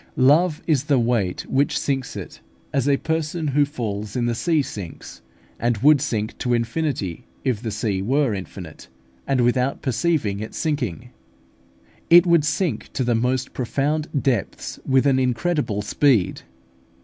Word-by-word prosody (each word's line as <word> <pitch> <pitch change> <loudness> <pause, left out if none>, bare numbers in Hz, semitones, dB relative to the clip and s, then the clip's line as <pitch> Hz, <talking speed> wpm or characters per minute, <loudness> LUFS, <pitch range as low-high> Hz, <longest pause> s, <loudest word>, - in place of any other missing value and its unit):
Love 150 +5 +3
is 150 -4 +1
the 145 -3 +3
weight 115 -6 0
which 140 +2 +1
sinks 135 -2 -2
it, - - -8 0.3
as 135 0 +1
a 140 - +4
person 160 0 -2
who 145 +2 +3
falls 105 -7 -4
in 120 -2 0
the 120 - +1
sea 155 +5 +1
sinks, 100 -10 -8 0.4
and 120 -1 +1
would 145 +4 +5
sink 110 -2 -2
to 125 -1 +1
infinity 115 - -2 0.2
if 125 -6 0
the 115 - -3
sea 105 -2 -1
were 130 +3 +1
infinite; 90 -6 -8 0.4
and 135 -2 +2
without 125 +2 +1
perceiving 130 -5 0
its 110 - -6
sinking, 140 - -2 1.0
it 175 +1 +8
would 170 -3 +4
sink 150 - -1
to 130 - -1
the 120 -1 +1
most 125 +3 0
profound 145 +5 -1
depths 125 -8 -2
with 135 0 +3
an 135 -2 +3
incredible 125 - 0
speed. 115 -2 +2
130 Hz, 150 wpm, -22 LUFS, 115-150 Hz, 1.0 s, it